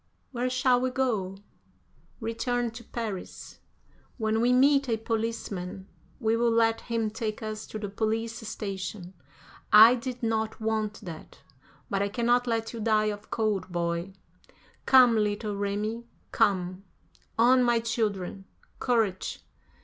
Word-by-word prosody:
"Where 250 -1 -1
shall 255 -1 +3
we 255 - +1
go?" 220 -8 -1 0.8
"Return 235 +1 -1
to 235 +1 -10
Paris. 220 -5 -6 0.6
When 220 -1 0
we 245 +1 +3
meet 275 +1 +4
a 225 - +1
policeman 220 -5 -4 0.3
we 225 -2 +2
will 235 +1 +2
let 225 0 +2
him 230 -2 -2
take 220 -1 -4
us 215 0 -5
to - - -6
the 210 -1 -4
police 225 +3 -2
station. 190 -3 -5 0.6
I 220 +3 +10
did 250 0 -5
not 220 -1 -1
want 220 -1 -2
that, 170 -6 -10 0.5
but 195 0 -1
I 200 - 0
cannot 240 +3 +1
let 225 -1 -1
you 230 - -6
die 215 -1 +2
of 205 0 -12
cold, 205 -5 -1
boy. 170 +2 -2 0.7
Come, 250 -3 +7
little 210 0 -1
Remi, 210 +4 -3 0.2
come. 185 -3 +1 0.5
On, 250 +3 +5
my 240 -1 +3
children. 210 -5 -2 0.3
Courage!" 225 -7 0
220 Hz, 135 wpm, -28 LUFS, 205-235 Hz, 0.8 s, I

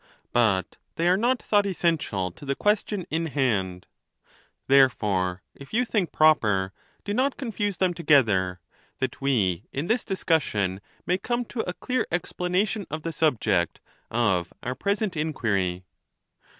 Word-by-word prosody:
But 105 -7 +2 0.2
they 170 - +1
are 180 - +5
not 240 +5 +1
thought 205 -1 +3
essen 170 -4 +1
tial 95 -8 -3
to - - -14
the 140 -1 -1
question 205 -1 0
in 165 +1 0
hand; 100 - -1 0.8
therefore, 105 -9 +3
if 140 +9 -9
you 250 +2 +3
think 205 -7 0
prop 155 -3 +5
er, 95 -2 0 0.3
do 205 - -3
not 260 +4 +1
confuse 205 -7 -2
them 185 -2 +2
together, 110 - +3 0.4
that 130 - -3
we 105 -8 +1
in 140 +4 -3
this 225 +7 +1
discus 165 -4 +1
sion 100 -6 -2 0.2
may 180 +1 +1
come 240 +4 -1
to 235 - -8
a - - -2
clear 255 0 -1
explanation 180 +3 -1
of 155 +2 -5
the 165 - -3
subject 110 - +1 0.3
of 95 -7 +1
our 125 - -2
present 200 - -1
inquiry. 100 - -1
150 Hz, 150 wpm, -26 LUFS, -, 0.8 s, are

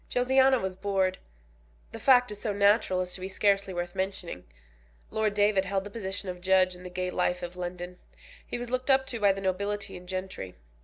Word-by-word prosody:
Josiana 265 +1 +4
was 190 -3 -3
bored. 190 -1 0 0.7
The - - -8
fact 250 -3 +5
is 205 - -6
so 215 -3 -1
natural 200 -2 +3
as 180 0 -4
to 185 - -7
be 190 - -4
scarcely 200 0 +2
worth 175 -1 -4
mentioning. 190 - -4 0.7
Lord 215 -1 0
David 205 -2 +3
held 195 0 -1
the 205 - -9
position 200 -2 -3
of 180 -1 -5
judge 185 0 +4
in 180 - -13
the 180 - -8
gay 180 0 -3
life 180 0 0
of 175 +1 -6
London. 180 0 -6 0.4
He - - -5
was 240 0 -6
looked 255 +1 -1
up 265 0 +5
to 240 -3 -4
by 200 -2 +5
the 195 0 -4
nobility 200 +2 -2
and 180 0 -11
gentry. 185 - -5
195 Hz, 205 wpm, -28 LUFS, 185-210 Hz, 0.7 s, fact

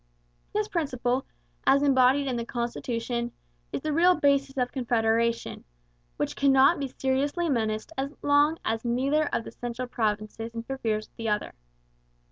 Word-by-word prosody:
This 425 0 0
principle, 265 - -1 0.4
as 275 +1 +5
embodied 270 0 +4
in 260 -2 -1
the 235 - -2
constitution, 235 0 -3 0.4
is - - -3
the 310 - -1
real 355 +4 +5
basis 280 -2 +2
of 250 -1 0
Confederation, 230 -2 0 0.5
which - - -2
cannot 275 +3 +5
be 275 - -2
seriously 280 +6 0
menaced 220 -1 -1
as 275 +1 -2
long 290 +2 +4
as 225 0 -1
neither 270 +6 +1
of - - -1
the - - -9
central 245 +1 -5
provinces 220 0 -2
interferes 230 -3 -2
with - - -40
the 225 -1 -2
other. 210 0 -1
255 Hz, 145 wpm, -27 LUFS, 230-280 Hz, 0.5 s, as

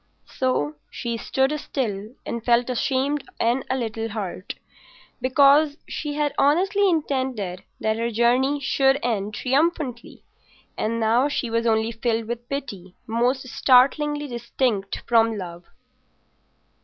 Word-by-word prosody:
So 155 - 0
she 235 -1 -4
stood 265 +4 0
still 220 -5 -4
and 235 -1 -4
felt 240 +1 +2
ashamed 270 +3 0 0.2
and 240 +3 +1
a 260 - +1
little 225 -2 -3
hurt, 200 -3 -5 0.7
because 285 +3 +4
she 295 -1 -4
had 295 0 0
honestly 385 +7 +3
intended 260 - -1 0.2
that 220 0 0
her 230 +1 0
journey 245 +5 +2
should 270 0 +3
end 210 -3 -1
triumphantly; 270 -2 -1 0.5
and 230 +2 -1
now 230 +5 +3
she 260 -5 -2
was 230 +1 +1
only 220 0 +2
filled 225 0 -1
with 235 +1 -6
pity 200 -10 -6
most 245 +3 0
startlingly 290 +4 +3
distinct 235 -4 -2
from 225 -2 +3
love. 175 -2 -7
240 Hz, 125 wpm, -23 LUFS, 225-275 Hz, 0.7 s, because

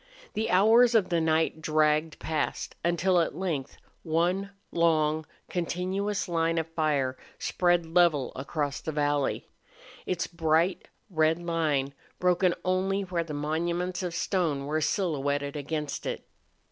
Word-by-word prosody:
The 220 +1 -1
hours 225 +6 +5
of 210 -5 +3
the 170 -2 +1
night 160 0 +1
dragged 155 0 +2
past 155 -1 -2
until 175 +2 +2
at 165 - 0
length 165 -8 -3 0.2
one 175 +5 0 0.2
long, 155 -2 +2 0.2
continuous 185 +4 -2
line 165 -1 +1
of 160 - +1
fire 150 -5 0 0.2
spread 175 -1 +1
level 160 -5 +3
across 140 +1 -3
the 160 - -3
valley, 145 -2 0 0.6
its 180 -1 -1
bright, 165 +2 +1 0.2
red 160 -1 +3
line 155 -5 0 0.2
broken 180 0 +2
only 190 +2 +1
where 180 -3 -2
the 155 -3 -6
monuments 170 +5 -1
of 175 -2 -3
stone 165 -7 0
were 155 +2 -1
silhouetted 145 -5 -1
against 150 0 -3
it. - - -4
165 Hz, 130 wpm, -28 LUFS, 155-180 Hz, 0.6 s, hours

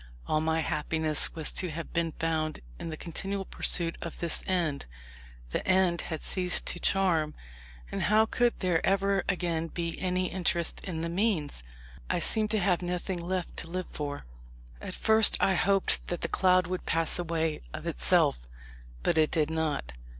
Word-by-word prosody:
All 155 - +1
my 160 +1 +1
happiness 155 0 -1
was 160 -2 -1
to 180 - +1
have 165 +1 -7
been 165 -1 0
found 155 -1 -2 0.2
in - - -5
the 155 - -5
continual 195 +4 -4
pursuit 165 -2 +1
of 170 - -6
this 170 -1 -2
end. 165 - 0 0.6
The - - -2
end 185 -2 +3
had 160 -3 -5
ceased 180 -1 0
to 175 - 0
charm, 170 -6 +2 0.6
and - - -3
how 215 +1 +4
could 240 +1 0
there 180 -4 +1
ever 195 0 +2
again 170 -3 -1
be 170 0 -4
any 185 0 0
interest 175 -2 -1
in 170 -4 -4
the 170 - -2
means? 170 - -1 0.5
I - - +1
seemed 215 -1 +4
to 215 0 +1
have 180 -2 +2
nothing 180 0 -3
left 180 0 -3
to 165 - -4
live 185 +1 -4
for. 145 - -5 0.6
At - - -5
first 220 -1 +6
I 190 - +3
hoped 195 +2 +2
that 175 - -3
the - - 0
cloud 185 -1 +3
would 180 +1 -5
pass 165 +1 +1
away 165 -2 -1
of - - -7
itself; - - +3 0.6
but 160 - +2
it 155 - +4
did 155 -2 0
not. 155 - -2
170 Hz, 170 wpm, -29 LUFS, 160-185 Hz, 0.6 s, first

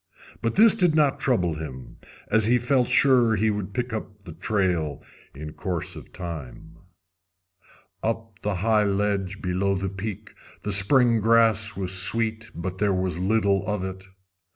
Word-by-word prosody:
But 115 -1 -1
this 220 +1 +7
did 180 -7 +2
not 150 -3 +2
trouble 90 -11 +1
him, 75 -5 -8 0.3
as 110 0 +2
he 125 +2 +4
felt 125 +1 +1
sure 125 -5 +4
he 110 +1 +1
would 105 -2 -4
pick 125 +3 -3
up 105 -2 -7
the 90 - -10
trail 85 -5 -1 0.3
in 75 +2 -8
course 90 -5 -4
of - - -12
time. 80 -2 -8 1.2
Up 115 0 -2
on - - -38
the 105 -1 -2
high 110 -2 +3
ledge 100 -1 -1
below 95 +2 0
the 95 +1 -3
peak 105 +2 -7 0.3
the 105 - -3
spring 115 +4 +5
grass 110 -1 +3
was 95 -1 -3
sweet, 110 +4 0
but 95 +2 -5
there 100 -2 +1
was 90 -2 -2
little 100 0 +1
of 105 -3 -2
it. 95 0 -7
100 Hz, 160 wpm, -24 LUFS, 95-115 Hz, 1.2 s, this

